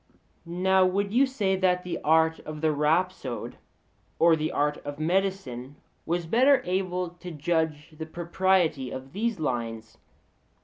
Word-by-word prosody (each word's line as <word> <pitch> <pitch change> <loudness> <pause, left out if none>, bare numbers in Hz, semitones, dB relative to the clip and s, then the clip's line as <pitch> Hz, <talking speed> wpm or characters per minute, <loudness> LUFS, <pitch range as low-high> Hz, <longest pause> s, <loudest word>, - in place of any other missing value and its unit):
Now 190 +2 +3
would 200 +2 0
you 265 +3 +4
say 205 -8 0
that 180 -1 +2
the 180 - -4
art 160 +1 +3
of 155 -1 -8
the 160 -1 +3
rhapsode 150 -3 -1 0.6
or 165 0 +5
the 155 0 -2
art 150 +1 0
of 145 0 -7
medicine 155 -7 -1 0.3
was 170 +1 -1
better 255 - +4
able 180 -1 -1
to 175 +1 -10
judge 160 -1 -1
of 155 - -19
the 160 - -5
propriety 170 -4 +1
of 130 +1 -8
these 225 -1 -1
lines? 115 -5 -4
170 Hz, 145 wpm, -27 LUFS, 150-190 Hz, 0.6 s, or